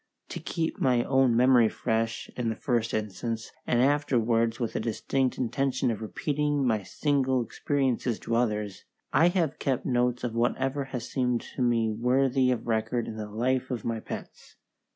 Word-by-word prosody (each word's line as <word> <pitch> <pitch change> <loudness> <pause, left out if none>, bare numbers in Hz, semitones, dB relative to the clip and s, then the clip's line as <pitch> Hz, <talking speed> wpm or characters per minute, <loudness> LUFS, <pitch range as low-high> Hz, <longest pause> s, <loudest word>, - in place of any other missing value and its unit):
To - - -5
keep 165 +3 -3
my 125 -7 +3
own 130 -3 +3
memory 125 -2 +5
fresh, 115 0 -1
in 120 -2 -1
the 110 - -2
first 120 -3 0
instance, 110 +2 -3 0.2
and 120 0 +3
afterwards 120 -5 +2
with 120 -3 -2
a - - +1
distinct 125 +3 -1
intention 130 0 0
of 110 - -5
repeating 145 +5 -1
my 110 -4 +2
single 130 +3 0
experiences 130 -2 -1
to 115 - -1
others, 105 -4 -1 0.3
I 155 +6 +5
have 175 -5 0
kept 135 -3 -1
notes 125 -1 +1
of 120 -2 -2
whatever 130 +4 0
has 125 -3 -5
seemed 125 -3 0
to - - -3
me 115 -2 +2
worthy 130 +3 +2
of 125 -2 -1
record 115 +1 -1
in 110 - -6
the 105 -1 -6
life 125 +4 0
of 120 -5 -4
my 115 -1 -1
pets. - - -9
125 Hz, 170 wpm, -28 LUFS, 115-135 Hz, 0.3 s, memory